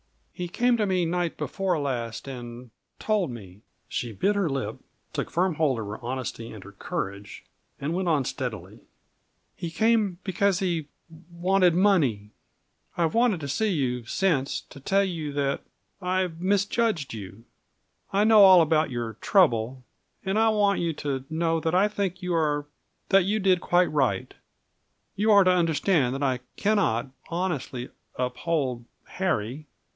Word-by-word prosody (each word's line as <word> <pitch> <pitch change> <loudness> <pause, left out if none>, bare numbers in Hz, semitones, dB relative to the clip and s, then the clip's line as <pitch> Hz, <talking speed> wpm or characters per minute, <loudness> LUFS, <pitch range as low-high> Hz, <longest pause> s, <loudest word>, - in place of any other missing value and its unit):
"He 180 -1 -4
came 245 +7 +2
to 210 -2 +1
me 185 -2 +1
night 175 0 -1
before 190 -4 -1
last, 120 -4 -3
and 120 -2 -8 0.3
told 210 -7 0
me." 100 -5 -10 0.3
She 120 - -3
bit 195 - +1
her 195 -5 +1
lip, 135 -1 -3 0.4
took - - -3
firm 180 +1 +1
hold 150 -5 +1
on 110 - -4
her 105 +3 -7
honesty 120 -2 -4
and 105 -4 -10
her 100 - -12
courage, 100 0 -5 0.4
and 145 +4 -2
went 185 +1 -1
on 145 -5 +2
steadily. - - -5 0.8
"He 170 - -5
came 215 0 +2
because 195 0 +1
he 170 -5 -1 0.4
wanted 180 0 +3
money. 145 - +2 0.7
I've 165 -2 +1
wanted 230 -6 +3
to 140 - -4
see 215 +11 0
you 130 -8 -1
since, 145 -1 0
to 140 - -14
tell 195 +8 +2
you 165 -6 -3
that 140 -1 -1 0.4
I 185 0 0
misjudged 200 - 0
you. 100 0 -9 0.7
I 200 +2 +3
know 215 -1 +7
all 190 -3 +9
about 160 0 +2
your 120 -3 -4
trouble, 130 - +2 0.4
and 195 +3 +1
I 225 0 +4
want 205 -2 +2
you 170 -1 0
to 140 -3 -3
know 165 0 0
that 160 +1 -1
I 195 +3 +5
think 195 -3 -3
you 180 -1 -1
are 150 -3 +1 0.4
that 195 -2 +5
you 210 +3 +1
did 185 -3 +3
quite 175 0 +2
right. 130 -10 0 0.8
You 210 +3 +1
are 200 -1 +7
to 185 - +4
understand 165 -5 +2
that 140 - -3
I 130 -2 +1 0.2
cannot 190 - +1 0.2
honestly 155 -8 -3 0.3
uphold 125 -1 -1 0.2
Harry. 150 - -2
165 Hz, 155 wpm, -26 LUFS, 130-190 Hz, 0.8 s, all